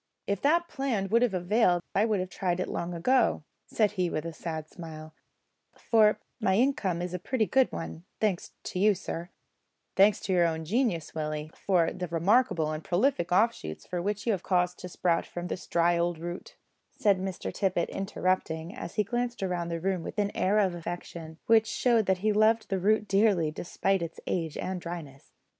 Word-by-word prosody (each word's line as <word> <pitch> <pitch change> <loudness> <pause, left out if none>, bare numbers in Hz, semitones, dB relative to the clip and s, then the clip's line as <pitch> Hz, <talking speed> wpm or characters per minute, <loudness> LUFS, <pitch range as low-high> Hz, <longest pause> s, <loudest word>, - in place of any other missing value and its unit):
"If 200 -1 -1
that 340 +4 +3
plan 250 - -2
would 230 +2 +4
have 240 -6 +2
availed 180 -1 +2
I 205 - +3
would 215 -3 +1
have 185 0 -5
tried 180 -1 -1
it 185 - -1
long 175 0 -3
ago," 245 0 +2 0.2
said 215 -3 +2
he, 185 -4 0
with 155 -1 -3
a 165 - -4
sad 160 -1 -5
smile, 155 -2 -9 0.6
"for 215 -2 +4 0.2
my 190 -4 +2
income 200 -8 +1
is 180 0 -4
a 180 - -2
pretty 225 +5 0
good 265 +3 +3
one, 165 0 -6 0.2
thanks 205 -5 -1
to 180 - -4
you, 205 +1 +5
sir 175 -1 -5 0.3
" - - -50
"Thanks 200 +1 +5
to 190 - -1
your 175 -2 +4
own 160 -1 -3
genius, 200 - 0
Willie, 155 0 -3
for 180 -4 +1
the 180 -1 -4
remarkable 170 -1 +2
and 155 0 -4
prolific 180 -2 +1
offshoots 180 - +1
which 195 +4 -2
you 235 - +2
have 195 -4 -1
caused 180 -1 +1
to 180 - -7
sprout 170 -1 0
from 175 0 -6
this - - -5
dry 170 0 +2
old 170 0 0
root," 175 +2 -7 0.3
said 200 -3 +2
Mr 190 -1 -4
Tippet, 185 -3 0
interrupting, 185 -3 -2
as 255 - -7
he 210 - +3
glanced 240 +1 -2
round 175 -2 -2
the 170 0 -2
room 185 0 -1
with 165 - -7
an 205 -1 0
air 195 +3 +2
of 195 -4 +3
affection, 170 -1 -7
which 225 -1 +5
showed 230 -4 +2
that 190 -1 +3
he 215 - +4
loved 220 +2 +3
the 195 -2 0
root 210 +2 +2
dearly, 195 -6 +3
despite 190 +4 -1
its 165 -1 -5
age 165 -4 -2
and 185 -1 -3
dryness. 165 -6 -8
185 Hz, 195 wpm, -28 LUFS, 170-210 Hz, 0.6 s, you